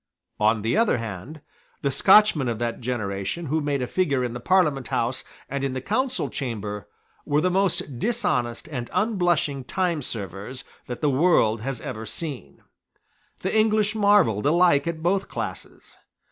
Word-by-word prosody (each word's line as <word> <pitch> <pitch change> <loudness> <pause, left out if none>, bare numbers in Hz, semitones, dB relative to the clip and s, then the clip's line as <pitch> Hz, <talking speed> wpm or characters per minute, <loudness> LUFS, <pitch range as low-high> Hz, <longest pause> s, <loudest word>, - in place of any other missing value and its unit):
On 110 0 +2
the 115 - +1
other 225 - +3
hand, 115 - -7 0.4
the 140 - +1
Scotchmen 190 -4 +5
of 115 - -2
that 120 +1 -3
generation 110 - -3
who 155 +2 0
made 145 -3 -1
a - - 0
figure 140 -4 0
in 120 -1 -2
the 125 - -5
Parliament 150 -4 +2
House 120 +3 -1 0.2
and 140 0 -3
in 135 -1 -1
the 130 - -2
Council 255 - -1
Chamber 105 -6 -5 0.4
were 145 +1 +1
the 180 +4 +1
most 180 -9 0
dishonest 125 - -1
and 125 -5 -5
unblushing 175 - +1
timeservers 125 - -3 0.2
that 125 - -6
the 150 - +3
world 130 -7 +3
has 135 +2 -4
ever 115 -6 -6
seen. 135 - -5 0.8
The - - -2
English 215 -1 +3
marvelled 200 - +3
alike 170 -2 +4
at 160 -1 -3
both 190 +3 +1
classes. - - -6
140 Hz, 155 wpm, -24 LUFS, 120-180 Hz, 0.8 s, Scotchmen